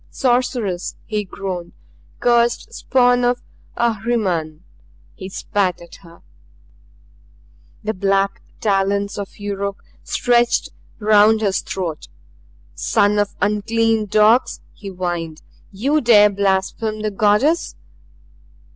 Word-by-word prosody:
"Sorceress!" 245 Hz, -8 st, -1 dB
he 215 Hz, -1 st, -2 dB
groaned. 185 Hz, -3 st, -6 dB, 0.5 s
"Cursed 235 Hz, -1 st, +1 dB
spawn 245 Hz, -1 st, +2 dB
of 245 Hz, 0 st, +1 dB, 0.3 s
Ahriman!" 200 Hz, -9 st, -1 dB, 0.5 s
He 190 Hz, -, -9 dB
spat 190 Hz, -2 st, -1 dB
at 170 Hz, -1 st, -13 dB
her. 170 Hz, -2 st, -17 dB, 1.6 s
The 215 Hz, +1 st, -1 dB
black 195 Hz, 0 st, 0 dB, 0.2 s
talons 200 Hz, 0 st, 0 dB
of 200 Hz, -, -7 dB
Yuruk 200 Hz, -1 st, -4 dB, 0.2 s
stretched 240 Hz, -1 st, +1 dB, 0.3 s
around 215 Hz, +1 st, +4 dB
his 195 Hz, -3 st, +1 dB
throat 170 Hz, -5 st, -5 dB, 0.7 s
"Son 205 Hz, -, +1 dB
of 205 Hz, -1 st, -1 dB
unclean 220 Hz, +1 st, +1 dB
dogs!" 215 Hz, +4 st, +3 dB
he 205 Hz, -, -11 dB
whined. 175 Hz, -4 st, -4 dB, 0.3 s
"You 275 Hz, +10 st, 0 dB
dare 210 Hz, -4 st, +6 dB
blaspheme 200 Hz, +2 st, -1 dB
the 215 Hz, -, -1 dB
Goddess!" 210 Hz, -, +2 dB
205 Hz, 100 wpm, -19 LUFS, 195-230 Hz, 1.6 s, dare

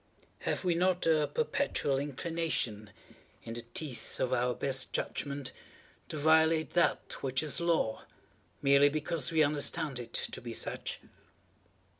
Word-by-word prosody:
Have -, -, -2 dB
we 180 Hz, -2 st, +3 dB
not 180 Hz, +1 st, +2 dB
a 155 Hz, -2 st, +4 dB
perpetual 145 Hz, -, 0 dB
inclination, 140 Hz, -7 st, -2 dB, 0.5 s
in 115 Hz, -, -6 dB
the 120 Hz, -, -5 dB
teeth 145 Hz, -7 st, -6 dB
of 130 Hz, 0 st, +1 dB
our 125 Hz, 0 st, +1 dB
best 135 Hz, -1 st, -1 dB
judgment, 140 Hz, -2 st, -2 dB, 0.6 s
to 155 Hz, -, -4 dB
violate 160 Hz, +1 st, +4 dB
that 175 Hz, -, +1 dB
which 130 Hz, +1 st, 0 dB
is 155 Hz, +2 st, +1 dB
Law, 165 Hz, -10 st, +1 dB, 0.6 s
merely 140 Hz, +1 st, +6 dB
because 155 Hz, -1 st, 0 dB
we 160 Hz, -1 st, +5 dB
understand 145 Hz, -1 st, -1 dB
it 120 Hz, -1 st, -8 dB
to -, -, -3 dB
be 115 Hz, -1 st, -6 dB
such? -, -, -3 dB
145 Hz, 135 wpm, -32 LUFS, 130-160 Hz, 0.6 s, merely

